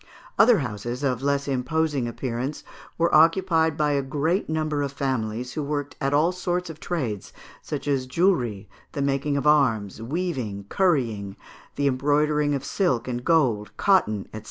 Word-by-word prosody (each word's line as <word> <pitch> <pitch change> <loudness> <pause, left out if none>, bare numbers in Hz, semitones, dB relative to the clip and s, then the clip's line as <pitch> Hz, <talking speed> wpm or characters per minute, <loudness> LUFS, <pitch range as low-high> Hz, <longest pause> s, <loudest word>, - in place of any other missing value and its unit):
Other 240 -3 +7
houses, 120 - -4
of 130 -3 0
less 140 0 0
imposing 140 0 0
appearance, 125 +3 -4 0.3
were 170 0 +1
occupied 165 -1 +4
by 150 -2 +2
a 140 -1 +1
great 155 +8 -1
number 155 -2 -1
of 140 -1 -2
families, 125 -3 -2
who 155 - -3
worked 145 0 -3
at 135 0 +1
all 155 +5 +3
sorts 180 -1 -2
of 155 - -13
trades, 125 - -3 0.3
such 150 -1 -5
as 135 -3 0
jewellery, 125 - +1 0.3
the 140 - -1
making 140 +1 0
of 140 - -2
arms, 115 -9 +2
weaving, 125 - -3
currying, 115 - 0 0.4
the 140 - -1
embroidering 145 +2 +2
of 140 0 -4
silk 130 - 0
and 120 -1 -3
gold, 115 -11 +1
cotton, 110 - +2
&c. 110 - -5
140 Hz, 155 wpm, -24 LUFS, 120-155 Hz, 0.4 s, Other